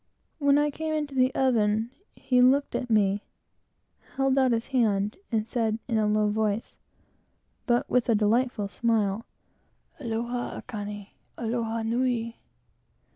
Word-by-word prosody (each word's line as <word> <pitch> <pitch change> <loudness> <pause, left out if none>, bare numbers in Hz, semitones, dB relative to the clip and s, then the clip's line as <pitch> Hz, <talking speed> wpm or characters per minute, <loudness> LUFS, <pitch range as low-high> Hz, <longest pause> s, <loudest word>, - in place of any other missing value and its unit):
When 285 -1 +4
I 295 0 +2
came 315 +1 -3
into 295 -2 -3
the 255 0 +3
oven 225 -3 +2 0.2
he 250 -1 +2
looked 270 +3 +4
at 250 - -3
me, 205 -2 +2 0.9
held 270 0 +2
out 260 -2 +3
his 230 0 0
hand, 210 -4 +2 0.2
and 220 -1 0
said, 225 -3 0
in 230 -3 +1
a 215 - +2
low 210 0 +2
voice, 215 0 -1 0.9
but 240 -1 +2
with 250 -1 +1
a 230 - +5
delightful 220 +1 +1
smile, 215 0 0 0.7
"Aloha, 240 -1 -3
Aikane! 205 -2 -7 0.3
Aloha 230 -1 -2
nui!" 230 0 -1
230 Hz, 130 wpm, -27 LUFS, 215-255 Hz, 0.9 s, a